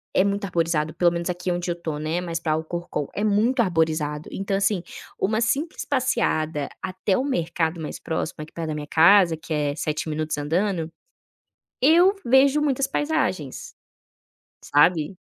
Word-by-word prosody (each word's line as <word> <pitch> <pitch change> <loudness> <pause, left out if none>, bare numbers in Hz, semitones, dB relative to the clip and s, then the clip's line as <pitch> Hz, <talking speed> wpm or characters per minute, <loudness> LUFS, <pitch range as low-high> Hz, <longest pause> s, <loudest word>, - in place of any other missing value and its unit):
é 185 - +5
muito 200 0 -1
arborizado. 165 -3 0
Pelo 175 0 +3
menos 170 +1 -3
aqui 180 0 -2
onde 175 0 -2
eu - - +1
estou, 160 -3 -5
né, 160 +3 -2
mais 170 -2 -3
para 160 -2 -2
Alcorcón 160 -2 -3
é 205 - -1
muito 220 +5 +2
arborizado. 160 -3 -1
Então, 195 0 -2
assim, 195 -2 +1 0.4
uma 220 +3 +1
simples 285 +8 -1
passeada 160 - 0
até 190 +1 -1
ao 255 - +1
mercado 170 - -1
mais 155 - -5
próximo 160 0 -3
aqui 155 - -13
perto 165 -1 -4
da 155 - -2
minha 150 -1 -5
casa, 170 +1 +5
que 160 +1 -14
é 145 -1 0
7 155 +1 -3
minutos 155 0 -2
andando, 165 +3 -1 1.0
eu 350 +7 +5
vejo 270 +4 +4
muitas 275 -2 0
paisagens, 290 - -2 0.9
sabe. 155 +3 +3
175 Hz, 160 wpm, -24 LUFS, 160-205 Hz, 1.0 s, é